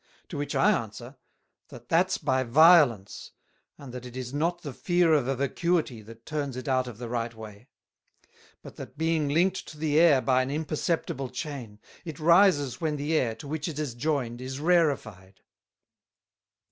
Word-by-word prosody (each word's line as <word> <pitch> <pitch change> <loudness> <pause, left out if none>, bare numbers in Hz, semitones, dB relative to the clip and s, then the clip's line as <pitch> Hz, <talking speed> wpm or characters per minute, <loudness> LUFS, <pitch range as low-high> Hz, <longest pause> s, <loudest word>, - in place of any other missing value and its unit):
To - - -6
which 145 - -4
I 210 - +4
answer, 120 - -4 0.5
That 120 - -13
that's 180 +3 +2
by 130 -3 0
violence, 130 - +4 0.4
and 135 -4 -11
that 125 -1 -7
it 125 0 -9
is 130 0 -6
not 170 +4 -1
the 145 -4 -6
fear 175 0 +2
of 140 -5 +2
a 135 - 0
Vacuity 140 -1 -1
that 115 +2 -14
turns 145 -4 -4
it 130 - -7
out 130 -1 +1
of 120 -4 -8
the 120 0 -6
right 115 0 -3
way; 110 +1 -12 1.0
but - - -12
that - - -10
being 160 -2 0
linked 175 +6 +1
to 155 - -11
the 150 0 +1
Air 160 -5 +6
by 130 0 +2
an 130 - -3
imperceptible 150 -2 -2
Chain, 125 -10 -7 0.2
it 160 -5 -8
rises 170 -5 +3
when 155 -2 -1
the 145 +2 -2
Air, 120 -7 +1
to 125 - -11
which 150 +2 -3
it 160 -4 -6
is 150 -5 -3
joined, 120 -2 -2
is 130 +1 -6
rarified. 140 - 0
140 Hz, 175 wpm, -27 LUFS, 120-160 Hz, 1.0 s, Air